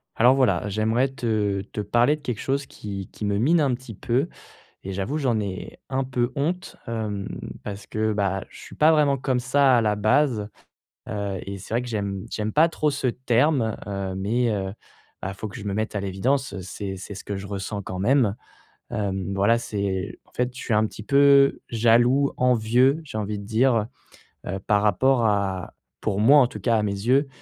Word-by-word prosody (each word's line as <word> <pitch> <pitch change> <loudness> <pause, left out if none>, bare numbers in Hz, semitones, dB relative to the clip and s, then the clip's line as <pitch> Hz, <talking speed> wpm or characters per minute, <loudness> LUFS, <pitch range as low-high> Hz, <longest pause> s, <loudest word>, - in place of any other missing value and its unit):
Alors, 125 +3 +5
voilà, 105 -8 +2
j'aimerais 110 +5 +1
te 110 -6 -1
te 105 - -3
parler 120 +7 +3
de 150 - -16
quelque 125 -6 -4
chose 140 0 -1
qui 100 -5 -7
qui 105 - -6
me 100 0 0
mine 160 +9 +4
un 140 -4 +2
petit 120 -3 -7
peu 125 - 0 0.6
et 95 - -5
j'avoue, 100 +11 -2
j'en 125 -6 +1
ai 100 -3 -5
un 135 0 0
peu 125 -1 -1
honte, 175 +6 -2
hem, 105 -4 -3 0.4
parce 100 0 -6
que, 110 0 0
bah, 95 -2 -1
je - - -14
suis - - -11
pas 155 +1 +5
vraiment 145 -3 +3
comme 130 -1 0
ça 130 +1 +4
à - - +3
la 105 -2 +1
base, 110 0 +2 0.6
heu 100 -2 -3
et 100 0 -5
c'est 100 +4 -7
vrai 120 - +1
que 125 - -7
j'aime 100 -3 -3
j'aime 110 -1 -3
pas 160 +3 +5
trop 155 -2 0
ce 140 -2 -2
terme, 125 0 +1
heu 100 -2 -3
mais 115 +5 +1
heu, 95 -2 -2 0.5
ah, 95 - -4
faut 110 - -6
que 100 - -8
je 105 - -8
me 100 - -2
mette 110 +1 -2
à 100 - -1
l'évidence, 100 +7 -1
c'est 95 +1 -6
c'est 95 +2 -8
ce 95 - -8
que 100 - -4
je 95 +1 -6
ressens 100 +1 -4
quand 95 -1 -5
même, 120 -1 +3 0.6
hem, 100 -2 -2
voilà, 100 +4 +3
c'est 100 -4 -3
en - - -29
fait, 125 0 -1
je - - -8
suis - - -3
un 110 +1 +3
petit 105 - -9
peu 140 +3 +5
jaloux, 120 +4 +3
envieux, 125 +4 +3
j'ai 135 -7 -6
envie 105 0 -3
de 100 - -8
dire, 115 0 +2 0.6
heu, 95 - -3
par 105 -1 +3
rapport 120 +5 +3
à 100 -4 0 0.3
pour 100 -3 -1
moi, 135 +8 +7
en 125 - +4
tout 105 - -8
cas, 115 +4 +2
à - - +1
mes 105 - 0
yeux, 125 +8 +1
110 Hz, 205 wpm, -24 LUFS, 100-130 Hz, 0.6 s, moi